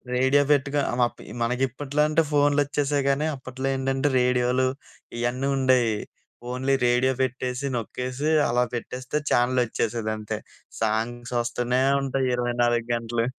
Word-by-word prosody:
Radio 130 +3 +4
పెట్టుకొ 145 0 +2
అమప్ 120 -1 0 0.2
మనకిప్పట్లో 135 +4 -1
అంటే 155 +1 +3
ఫోన్‌లొచ్చేశాయి 145 0 +2
కానీ, 140 +3 +1
అప్పట్లో 130 0 -5
ఏంటంటే 135 +1 0
రేడియోలు 125 +1 +2 0.5
ఇయన్నీ 120 +3 -1
ఉండేయి. 130 -3 +3 0.6
ఓన్లీ 130 +2 0
రేడియో 125 +2 +3
పెట్టేసి, 130 +1 -3
నొక్కేసి, 125 +5 -3 0.2
అలా 125 +1 +2
పెట్టేస్తే, 130 +4 -3
ఛానెలొచ్చేసేదంతే. 115 -3 0 0.4
సాంగ్స్ 115 +3 -1
వస్తనే 120 +2 0 0.2
ఉంటయి 135 -1 0
ఇరవై 120 0 -1
నాలుగు 120 -1 +1
గంటలు. 115 0 -1
125 Hz, 110 wpm, -25 LUFS, 120-135 Hz, 0.6 s, రేడియో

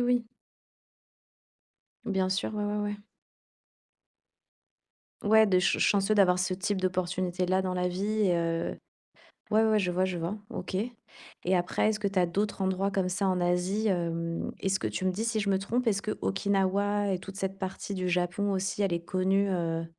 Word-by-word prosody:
oui. 245 -1 +2 1.8
Bien 190 -3 0
sûr, 190 +3 -1
ouais, 210 0 -1
ouais, 205 0 -1
ouais. 205 0 -2 2.3
Ouais 220 +1 +6
de 185 -2 +3
ch 180 - +2
chanceux 200 +1 +3
d'avoir 180 -3 +5
ce 185 +1 0
type 190 +1 -1
d'opportunité-là 185 0 0
dans 185 -1 -2
la 180 0 0
vie 205 +4 -1
et 175 - +3
heu 165 0 -1 0.8
ouais, 220 +1 +5
ouais, 220 - +3
ouais, 215 - +4
je 180 -3 0
vois, 185 +1 +2
je 185 -2 -2
vois, 170 +5 -3
OK. - - -6 0.7
Et 185 +1 +3
après, 175 +4 +1
est-ce 215 - -2
que 205 - +1
tu 195 -1 -1
as 180 - +4
d'autres 205 +4 -2
endroits 190 +1 +1
comme 190 -2 0
ça 190 +2 0
en 185 -1 +1
Asie? 180 +5 +1
Hem, 170 -3 -1
est-ce 195 0 0
que- - - -1
tu 185 - -4
me 185 - +2
dis 215 +5 -2
si 225 -1 0
je 200 -1 -1
me 190 - +3
trompe- 240 +6 -1
est-ce 200 -2 +2
que 215 - -3
Okinawa 200 +1 +1
et 185 - 0
toute 195 0 -9
cette 195 0 -3
partie 190 +1 -4
du 185 -1 -2
Japon 180 +3 0
aussi, 195 +2 -1
elle 195 -3 +1
est 170 0 -2
connue, 190 +2 +1
heu, 165 -3 -1
190 Hz, 190 wpm, -29 LUFS, 180-205 Hz, 2.3 s, Ouais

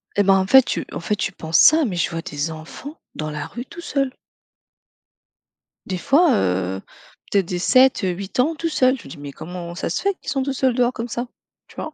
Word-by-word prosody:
Et 205 - +4
bah 195 0 +5
en 190 0 +2
fait 265 +3 +8
tu - - -3
en - - -5
fait 190 +5 -1
tu 200 - -2
penses 160 -3 0
ça, 310 0 +7
mais 190 -6 -3
je 170 - 0
vois 165 0 -4
des 145 +2 -3
enfants 160 - -9 0.2
dans 155 0 -4
la 150 0 -4
rue 245 +1 -7
tout 345 - -10
seul. 275 -5 -1 1.8
Des 185 -2 -3
fois, 290 - +4
heu, 95 - 0 0.5
peut-être, 195 -3 +3
des 180 0 -3
7-8 200 -5 +2
ans 320 +6 0
tout 330 - -2
seul, 255 -4 +2
je - - -14
me 135 - -10
dis: - - -9
«Mais 145 -1 -8
comment 175 +3 -8
ça 180 - -3
se 165 - -2
fait 400 0 +1
qu'ils - - -9
sont 270 -1 0
tous 275 - -2
seuls 260 -1 +1
dehors 245 -1 +2
comme 230 +1 -4
ça», 240 +2 -4 0.4
tu - - -19
vois? 310 - -5
200 Hz, 230 wpm, -21 LUFS, 170-265 Hz, 1.8 s, fait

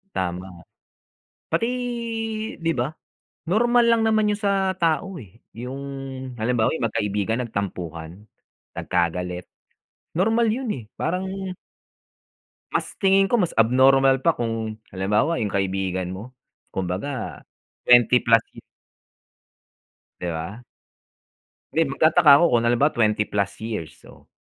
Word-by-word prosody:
Tama. 90 -1 -4 0.8
Pati 165 +8 +1 1.0
'di 165 - +1
ba, 125 +4 0 0.6
normal 240 +4 +4
lang 230 -1 +4
naman 220 -1 +3
yun 205 - +1
sa 195 -2 +1
tao, 170 +2 0
eh, 105 - -11 0.2
yung 125 +3 -6 0.6
halimbawa 115 0 +1
yung 120 - -3
magkaibigan 105 +3 -1
nagtampuhan, 90 -6 -5 0.6
nagkagalit, 90 0 -2 0.7
normal 225 +5 +3
yun, 245 +2 -1
eh, 120 - -7
parang 190 +3 -3 1.2
Mas - - +1 0.2
tingin 195 0 +5
ko 240 - -2
mas 175 - 0
abnormal 135 +3 +4
pa 170 - +4
kung 115 -2 -3 0.2
halimbawa 105 - +1
yung 105 - -1
kaibigan 95 -2 -1
mo, 105 +7 -8 0.4
kumbaga 95 +9 -4 0.4
20 125 0 +5
plus, 115 -1 +5
hmm. - - -11 1.6
'Di 90 - -3
ba? 85 +8 -5 1.1
Hindi, 165 -1 +2
magtataka 155 0 +5
ako 170 - +5
kung 120 -1 +2
halimbawa 120 +5 +3
20 105 -4 +2
plus 100 -1 -1
years 105 -8 -5
so, - - -17
120 Hz, 115 wpm, -23 LUFS, -, 1.6 s, tingin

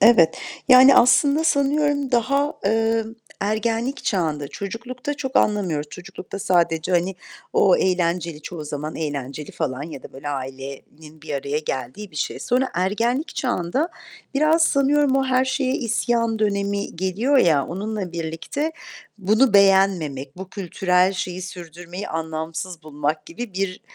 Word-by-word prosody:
Evet. 175 -9 +6 0.3
Yani, 260 +1 +9
aslında, 280 +5 +5
sanıyorum, 285 -2 +2
daha, 275 +5 +2
emm, 225 +1 +1 0.3
ergenlik 225 +5 -1
çağında, 155 -7 -1
çocuklukta 245 - -5
çok 265 -2 -3
anlamıyoruz, 180 -8 +1
çocuklukta 180 +4 -9
sadece, 170 -2 +1
hani, 180 +2 +1 0.4
o 190 -3 +5
eğlenceli, 170 -3 0
çoğu 165 -2 -7
zaman 150 +1 -5
eğlenceli 145 -1 -4
falan 130 +1 -3
ya 150 -3 -8
da - - -11
böyle, 140 +2 -7
ailenin 140 +3 -7
bir 155 -2 -5
araya 140 +2 -1
geldiği 150 - -5
bir 155 - -13
şey. 150 - -2
Sonra 255 +2 +1
ergenlik 230 - 0
çağında 250 - -1 0.5
biraz 310 +3 +4
sanıyorum 280 -1 +3
o 270 - +2
her 260 0 +2
şeye 265 0 0
isyan 230 -1 0
dönemi 200 -2 -1
geliyor 200 +10 +1
ya, 155 - +4
onunla 195 0 -4
birlikte 170 - -3 0.5
bunu 215 +4 +3
beğenmemek, 185 -9 +3
bu 190 0 -8
kültürel 185 -1 +1
şeyi 185 -1 -4
sürdürmeyi 175 +1 -8
anlamsız 160 +2 -4
bulmak 150 0 -3
gibi 245 - -7
bir, 190 -1 -2
190 Hz, 135 wpm, -22 LUFS, 160-245 Hz, 0.5 s, Yani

